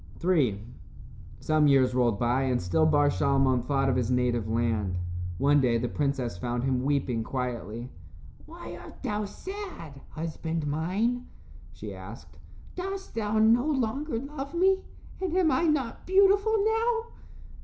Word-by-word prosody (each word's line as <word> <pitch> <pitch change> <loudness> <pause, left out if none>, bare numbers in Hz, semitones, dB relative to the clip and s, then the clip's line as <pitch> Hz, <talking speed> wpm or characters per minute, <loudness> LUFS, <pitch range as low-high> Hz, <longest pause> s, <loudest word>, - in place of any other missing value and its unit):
III 140 - +2 0.8
Some 155 -1 +3
years 130 -3 +4
rolled 120 -4 +2
by 120 +3 +1
and 125 -2 +1
still 125 - +2
Bar 145 -2 +4
Shalmon 135 -2 +2
thought 135 0 +1
of 130 - +2
his 125 -3 0
native 125 -3 +1
land. 110 -5 0 0.4
One 145 +6 +4
day 120 -3 +2
the 120 +2 -1
princess 130 -8 -2
found 120 +2 -2
him 130 -1 +1
weeping 135 -4 0
quietly. 120 -2 -4 0.6
"Why - - -9
art - - -13
thou 210 0 -1
sad, 360 - -8
husband 160 0 -4
mine?" 195 +12 -1 0.4
she 100 +3 -8
asked. 95 +5 -11 0.3
"Dost 385 +2 -5
thou 220 -1 -1
no 230 +5 +4
longer 270 -1 -1
love 280 +3 -6
me, 380 +2 +3 0.4
and 365 -2 -1
am 345 -4 +4
I 340 - +2
not 295 -7 -1
beautiful 400 +3 +4
now?" 455 +1 +1
145 Hz, 145 wpm, -28 LUFS, -, 0.8 s, years